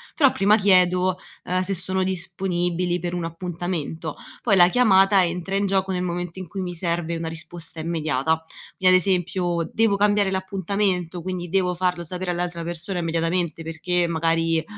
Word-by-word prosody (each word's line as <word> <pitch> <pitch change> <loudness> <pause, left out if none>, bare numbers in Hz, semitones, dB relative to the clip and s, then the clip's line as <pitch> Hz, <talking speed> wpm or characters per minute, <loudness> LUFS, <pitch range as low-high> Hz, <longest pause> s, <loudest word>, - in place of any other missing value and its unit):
però 275 -4 +5
prima 205 +2 +4
chiedo, 185 -2 +3 0.3
ehm, 185 +1 0
se 195 +1 0
sono 185 +2 0
disponibili 180 -1 -1
per 175 +1 -4
un 175 -2 -2
appuntamento. 165 -2 -4 0.3
Poi, 205 -5 +3
la 175 -1 +7
chiamata 195 -4 +5
entra 180 +3 -3
in 200 0 +1
gioco 190 0 0
nel 180 -1 -1
momento 175 0 -4
in 185 - -7
cui 195 +2 -5
mi 180 -1 -4
serve 170 -1 -2
una 165 0 -4
risposta 165 0 -6
immediata, 160 -1 -1 0.3
vi 185 - -4
è - - +8
ad 185 - +7
esempio 180 -2 0
devo 220 -3 +2
cambiare 205 -1 +2
l’appuntamento, 190 -2 -1
quindi 180 -1 -5
devo 180 -1 +1
farlo 180 -1 -1
sapere 180 +2 -3
all’altra 175 -1 -3
persona 175 +2 -4
immediatamente 165 0 -1
perché 170 +2 -1
magari 165 0 +1
180 Hz, 165 wpm, -23 LUFS, 170-190 Hz, 0.3 s, è